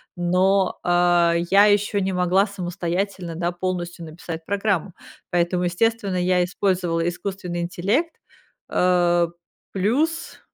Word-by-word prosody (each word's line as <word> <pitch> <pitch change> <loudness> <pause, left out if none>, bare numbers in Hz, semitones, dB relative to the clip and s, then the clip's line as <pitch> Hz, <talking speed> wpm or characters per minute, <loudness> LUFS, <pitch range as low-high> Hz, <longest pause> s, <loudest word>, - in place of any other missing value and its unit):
Но, 185 +2 +1
а, 175 -1 +3 0.2
я 200 +1 +6
ещё 205 0 +2
не 190 -1 -1
могла 180 +2 +2
самостоятельно, 180 -1 -3
да, 175 +1 -1
полностью 175 -1 -4
написать 160 0 -8
программу, 200 -2 -1 0.4
поэтому, 175 +1 +1
естественно, 195 +1 0
я 180 0 +2
использовала 175 -3 -1
искусственный 180 -1 -5
интеллект, 200 - -1 0.5
э. 175 -1 +3 0.5
Плюс, 290 - -1
180 Hz, 110 wpm, -22 LUFS, 175-200 Hz, 0.5 s, я